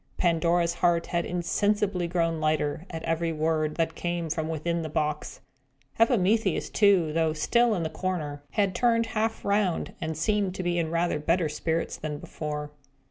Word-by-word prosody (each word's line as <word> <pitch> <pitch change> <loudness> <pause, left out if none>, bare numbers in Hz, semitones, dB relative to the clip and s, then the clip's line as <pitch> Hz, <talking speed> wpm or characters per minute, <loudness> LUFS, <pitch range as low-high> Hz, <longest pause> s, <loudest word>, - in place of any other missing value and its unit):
Pandora's 170 0 +2
heart 170 -1 +2
had 170 -1 -1
insensibly 195 +1 0
grown 165 -2 0
lighter, 155 +2 0
at 160 -1 -6
every 165 0 0
word 155 -1 0
that 165 -1 0
came 170 -1 -3
from 160 0 -2
within 170 +2 -1
the 160 - -4
box. 150 -1 -2 0.6
Epimetheus, 225 -1 +2
too, 190 -7 +4
though 160 -1 +2
still 235 +8 +2
in 175 - -1
the 160 - -2
corner, 160 -4 -3
had 200 -3 +1
turned 230 +2 +2
half 225 0 -2
round, 200 -4 +1
and 160 -1 -3
seemed 195 +2 0
to 185 - -3
be 175 0 0
in 165 -2 -1
rather 170 -2 0
better 165 +2 +1
spirits 165 +2 -2
than 150 -1 -4
before. 150 -2 -5
170 Hz, 165 wpm, -27 LUFS, 160-185 Hz, 0.6 s, too